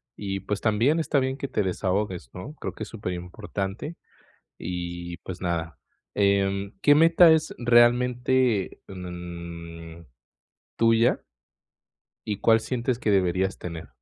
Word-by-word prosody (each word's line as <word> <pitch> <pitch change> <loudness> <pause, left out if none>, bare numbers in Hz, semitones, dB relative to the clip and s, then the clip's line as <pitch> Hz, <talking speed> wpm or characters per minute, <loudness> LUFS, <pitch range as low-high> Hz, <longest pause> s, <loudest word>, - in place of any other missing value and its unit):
Y, 95 -2 -4
pues, 100 +1 -3
también 120 +9 +2
está 150 -3 +1
bien 130 +1 -1
que 140 - -4
te 105 - 0
desahogues, 95 - -2
¿no? 140 +12 -7
Creo - - -4
que - - -6
es - - -8
super 100 -5 -4
importante. 95 - -5 0.6
Y, 85 0 -5
pues, 90 -2 -8
nada, 85 -4 -2 0.4
em, 100 -1 +1
¿qué 145 - +6
meta 165 +2 +7
es 160 0 +1
realmente, 120 -1 +3
mm, 85 -2 -8 0.7
tuya? 115 +1 +3 1.1
Y, 105 - -2
¿cuál 115 0 +5
sientes 125 +1 -2
que 105 - -1
deberías 95 -1 +1
tener? 85 -2 -7
100 Hz, 130 wpm, -26 LUFS, 90-120 Hz, 1.1 s, meta